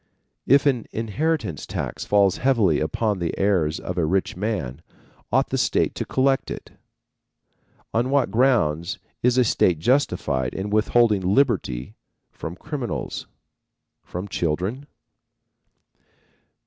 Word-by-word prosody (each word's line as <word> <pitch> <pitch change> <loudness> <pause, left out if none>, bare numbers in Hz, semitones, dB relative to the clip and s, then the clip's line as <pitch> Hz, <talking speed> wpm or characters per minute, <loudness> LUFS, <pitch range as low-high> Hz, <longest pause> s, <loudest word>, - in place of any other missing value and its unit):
If 140 +2 +5
an 130 -6 +1
inheritance 115 - -2
tax - - -4
falls 100 -2 +3
heavily 115 - +3
upon 105 +6 -1
the 85 -2 -2
heirs 90 -6 +1
of 90 0 -4
a - - +2
rich 95 +3 0
man, 90 - -3 0.5
ought - - +2
the - - -1
state - - +1
to - - -4
collect 135 0 +1
it? - - -7 1.2
On 120 +3 +1
what 140 -1 +2
grounds 105 - +2 0.2
is 125 +1 +3
a 125 - +6
state 90 -6 +2
justified 75 - 0
in 100 +2 -3
withholding 110 -1 +3
liberty 95 - +1 0.4
from 80 - -7
criminals? 130 +2 -5 0.7
From 90 +3 -6
children? 95 - -2
105 Hz, 120 wpm, -23 LUFS, 85-125 Hz, 1.2 s, a